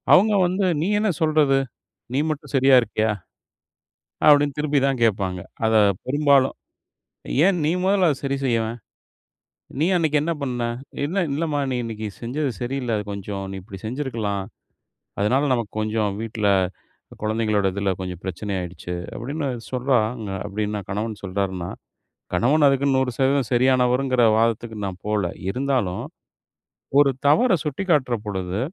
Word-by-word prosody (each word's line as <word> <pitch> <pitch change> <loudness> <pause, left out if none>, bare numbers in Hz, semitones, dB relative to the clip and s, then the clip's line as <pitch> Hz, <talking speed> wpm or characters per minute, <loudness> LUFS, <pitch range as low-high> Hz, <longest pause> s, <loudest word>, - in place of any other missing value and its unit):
அவங்க 210 +4 +6
வந்து, 185 +2 0 0.2
"நீ 170 - 0
என்ன 215 0 +1
சொல்றது? 155 -3 +3 0.6
நீ 135 - +2
மட்டும் 150 -1 -5
சரியாருக்கியா?" 125 -5 +4 1.2
அப்டின்னு 145 -1 +5
திருப்பி 150 -1 +1
தான் 135 -2 0
கேட்பாங்க. 95 -4 +1 0.3
அத 110 0 +2 0.3
பெரும்பாலும். 140 -1 +3 0.9
"ஏன் 195 -1 +3
நீ 155 - +2
முதல்ல 190 -1 +3
அத 145 - +1
சரி 140 0 -1
செய்யவேன்? 115 -2 0 1.0
நீ 155 - +3
அன்னைக்கு 155 -3 +2
என்ன 170 +3 0
பண்ண? 125 -3 -2 0.4
என்ன?" 185 +6 0
"இல்லம்மா 150 -1 -1
நீ - - 0
இன்னைக்கு 110 -2 -5
செஞ்சது 135 +4 -2
சரியில்ல, 125 -2 -2
அத 105 - -3
கொஞ்சம் 100 0 -5
நீ - - -5
இப்டி 95 -1 -10
செஞ்சிருக்கலாம். 110 -6 -2 0.8
அதனால 125 +7 +2
நமக்கு 115 -4 -3
கொஞ்சம் 110 -1 0
வீட்டுல. 110 -2 -1 0.7
குழந்தைங்களோட 110 -2 +1
இதுல 100 0 0
கொஞ்சம் 90 -2 -6
பிரச்சன 95 +2 -4
ஆயிடுச்சு" 90 0 -6 0.2
அப்டின்னு 140 +4 -3 0.2
சொல்றாங்க, 120 -4 0 0.2
அப்டின்னா 105 +1 -2
கணவன் 105 +2 -3
சொல்றாருன்னா. 95 -2 -2 0.6
கணவன் 145 +5 +3
அதுக்குன்னு 135 0 +2
100% 130 0 +1
சரியானவருங்கற 125 0 +3
வாதத்துக்கு 115 0 0
நான் 95 -2 -5
போல. 105 -1 0 0.3
இருந்தாலும், 120 -4 -1 0.9
ஒரு 145 -1 +6 0.2
தவற 165 - +4
சுட்டிக்காட்டுற 150 -5 +1
பொழுது. 95 -1 -3
125 Hz, 125 wpm, -23 LUFS, 105-140 Hz, 1.2 s, அவங்க